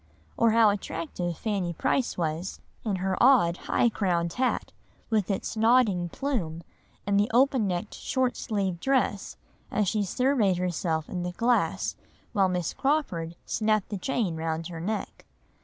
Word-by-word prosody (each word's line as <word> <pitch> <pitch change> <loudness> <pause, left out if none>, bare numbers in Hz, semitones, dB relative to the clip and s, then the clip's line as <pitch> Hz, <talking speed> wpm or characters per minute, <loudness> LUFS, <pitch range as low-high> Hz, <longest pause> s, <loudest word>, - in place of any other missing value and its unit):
Or 230 - +4
how 220 -1 +5
attractive 175 -3 -4
Fanny 195 -6 -2
Price 245 - 0
was 165 +2 -2 0.2
in 210 -4 -1
her 190 +1 -1
odd 235 -10 +5
high - - +3
crowned 175 -6 0
hat, 255 0 -1 0.4
with 215 -3 +1
its 195 +2 -2
nodding 220 -6 +3
plume, 170 - -3 0.4
and 200 0 +2
the 205 - +2
open 250 -2 +3
necked 180 +3 -3
short 260 -2 -1
sleeved 195 -6 -2
dress, 260 -4 0 0.3
as 210 -2 0
she 210 +3 +1
surveyed 220 -2 +2
herself 170 -3 -1
in 180 - -4
the 180 0 -3
glass 235 +5 +1 0.4
while 195 -4 +3
Miss 180 -3 -1
Crawford 185 - -1
snapped 215 -2 0
the 205 - -3
chain 210 -6 -1
round 160 +1 -3
her 165 -2 -7
neck. 210 +5 -4
200 Hz, 150 wpm, -27 LUFS, 175-230 Hz, 0.4 s, how